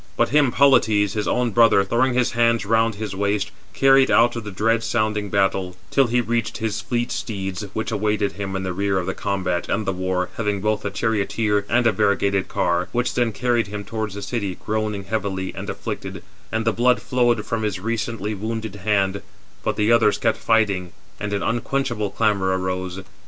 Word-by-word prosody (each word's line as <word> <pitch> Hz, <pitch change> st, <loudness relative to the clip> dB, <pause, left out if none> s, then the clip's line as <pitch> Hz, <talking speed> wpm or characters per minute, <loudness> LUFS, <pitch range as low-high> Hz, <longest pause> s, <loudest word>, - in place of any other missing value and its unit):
But 120 Hz, -, +2 dB
him 145 Hz, -3 st, +3 dB
Polites, 110 Hz, -8 st, +4 dB
his 105 Hz, -1 st, -2 dB
own 125 Hz, -1 st, +1 dB
brother, 115 Hz, -2 st, +5 dB
throwing 120 Hz, +5 st, +1 dB
his 125 Hz, -1 st, +2 dB
hands 115 Hz, -1 st, +2 dB
round 115 Hz, +1 st, +2 dB
his 105 Hz, -2 st, -5 dB
waist, 100 Hz, +1 st, -1 dB, 0.2 s
carried 135 Hz, 0 st, +5 dB
out 120 Hz, +1 st, +4 dB
of 115 Hz, -, -4 dB
the 105 Hz, -, -6 dB
dread 115 Hz, +3 st, +1 dB
sounding 110 Hz, -3 st, -1 dB
battle, 95 Hz, -2 st, 0 dB, 0.2 s
till 135 Hz, -2 st, +4 dB
he 120 Hz, +1 st, +2 dB
reached 115 Hz, -1 st, -1 dB
his 110 Hz, 0 st, -2 dB
fleet 120 Hz, -1 st, -2 dB
steeds, 95 Hz, -2 st, -4 dB
which 110 Hz, +1 st, -3 dB
awaited 105 Hz, -1 st, 0 dB
him 95 Hz, +1 st, -5 dB
in 95 Hz, -, -2 dB
the 95 Hz, -1 st, -2 dB
rear 100 Hz, +1 st, 0 dB
of 90 Hz, -, -1 dB
the 95 Hz, -, -2 dB
combat 95 Hz, -3 st, -2 dB
and 110 Hz, -, 0 dB
the 95 Hz, -, 0 dB
war, 90 Hz, 0 st, -1 dB
having 105 Hz, -3 st, -1 dB
both 105 Hz, +1 st, -1 dB
a 100 Hz, -, -1 dB
charioteer 105 Hz, 0 st, 0 dB
and 120 Hz, +1 st, +2 dB
a 115 Hz, -, +5 dB
variegated 100 Hz, -2 st, +1 dB
car; 85 Hz, 0 st, 0 dB
which 125 Hz, 0 st, 0 dB
then 120 Hz, -2 st, +1 dB
carried 120 Hz, +1 st, 0 dB
him 105 Hz, 0 st, -6 dB
towards 110 Hz, -1 st, -4 dB
the 100 Hz, -, -6 dB
city, 100 Hz, -3 st, -3 dB
groaning 110 Hz, -2 st, -2 dB
heavily 95 Hz, -2 st, -3 dB
[and] -, -, -6 dB
afflicted; -, -, -5 dB, 0.3 s
and 110 Hz, 0 st, -1 dB
the 115 Hz, -, +2 dB
blood 125 Hz, -1 st, +3 dB
flowed 120 Hz, -1 st, +1 dB
from 115 Hz, -1 st, -2 dB
his 105 Hz, -4 st, -2 dB
recently 110 Hz, 0 st, -2 dB
wounded 110 Hz, 0 st, -4 dB
hand: 100 Hz, -1 st, 0 dB, 0.4 s
but -, -, -1 dB
the 105 Hz, +2 st, +2 dB
others 115 Hz, -3 st, +4 dB
kept 115 Hz, -, 0 dB
fighting, 100 Hz, -6 st, +1 dB, 0.3 s
and 105 Hz, 0 st, -3 dB
an 100 Hz, -1 st, -1 dB
unquenchable 120 Hz, -2 st, -1 dB
clamour 100 Hz, -3 st, +1 dB
arose. 95 Hz, 0 st, -3 dB
105 Hz, 195 wpm, -22 LUFS, 100-115 Hz, 0.4 s, brother